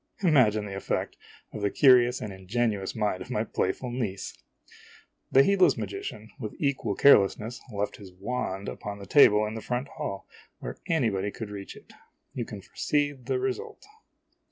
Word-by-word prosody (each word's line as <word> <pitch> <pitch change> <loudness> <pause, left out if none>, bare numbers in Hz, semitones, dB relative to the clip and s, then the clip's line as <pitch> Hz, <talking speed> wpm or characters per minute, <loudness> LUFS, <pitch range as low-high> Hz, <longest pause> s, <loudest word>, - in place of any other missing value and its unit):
Imagine 120 - +4
the 100 -1 -6
effect 95 - -2 0.4
upon 105 - -6
the 100 - +2
curious 125 0 +5
and 105 -2 -5
ingenuous 100 +1 -2
mind 105 -4 -1
of - - -8
my - - 0
playful 125 -2 -2
niece! 110 -6 -4 1.0
The 135 - +7
heedless 195 +3 +4
magician, 250 - -6
with 110 -4 -6
equal 130 -8 -1
carelessness, 110 -2 +4
left 105 0 -3
his 100 -3 -12
wand 100 0 -4
upon 105 -2 -6
the 100 - -9
table 105 -2 +6
in 105 - -4
the 110 - -5
front 125 +4 -3
hall, 100 0 -5 0.3
where - - -7
anybody 110 - +1
could 105 0 -7
reach 100 -1 -7
it. - - -16 0.4
You 120 - -3
can 105 -3 -8
foresee 145 +6 0
the 130 -1 -3
result. 130 0 -4
110 Hz, 160 wpm, -27 LUFS, 100-130 Hz, 1.0 s, The